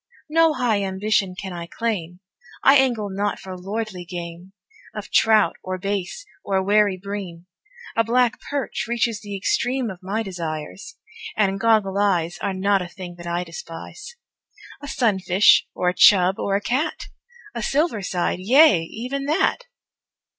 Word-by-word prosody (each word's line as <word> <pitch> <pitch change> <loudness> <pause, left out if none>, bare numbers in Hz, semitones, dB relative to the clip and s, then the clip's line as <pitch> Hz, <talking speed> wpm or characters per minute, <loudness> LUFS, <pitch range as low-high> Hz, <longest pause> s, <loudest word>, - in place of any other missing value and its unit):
No 325 0 +4
high 235 -5 +1
ambition 195 0 0
can 190 0 -6
I 170 -1 -6
claim 180 -5 -4 0.4
I 275 - +7
angle 245 -6 +2
not 205 +2 -1
for 185 -1 -8
lordly 195 0 -5
game 175 +1 -8 0.4
Of - - -7
trout, 220 -1 +4
or 185 0 -4
bass, 200 - -4 0.2
or 190 -1 0
wary 205 -1 +3
bream 185 -3 -7 0.5
A 230 - +3
black 245 +2 +1
perch 285 -3 -3
reaches 230 -2 -1
the 205 -2 -6
extreme 245 +4 0
Of 185 0 -11
my 205 +4 -2
desires; 170 - -6 0.4
and 195 -2 +1
"goggle 210 -3 +2
eyes" 175 -4 +1
Are - - -2
not 195 +1 +2
a 180 - -5
thing 180 -1 -9
that 175 0 -9
I 170 +1 -1
despise; 170 - -9 0.7
A 285 - -8
sunfish, 200 -7 +3
or 180 - +1
a - - -1
"chub," 190 -1 +5
or 195 - 0
a 200 - 0
"cat" 260 +9 -2 0.4
A - - -4
"silver 275 -2 0
side" 180 -1 -1
yea, 240 - +5
even 250 +11 -5
that! 305 +3 0
200 Hz, 155 wpm, -22 LUFS, 180-230 Hz, 0.7 s, I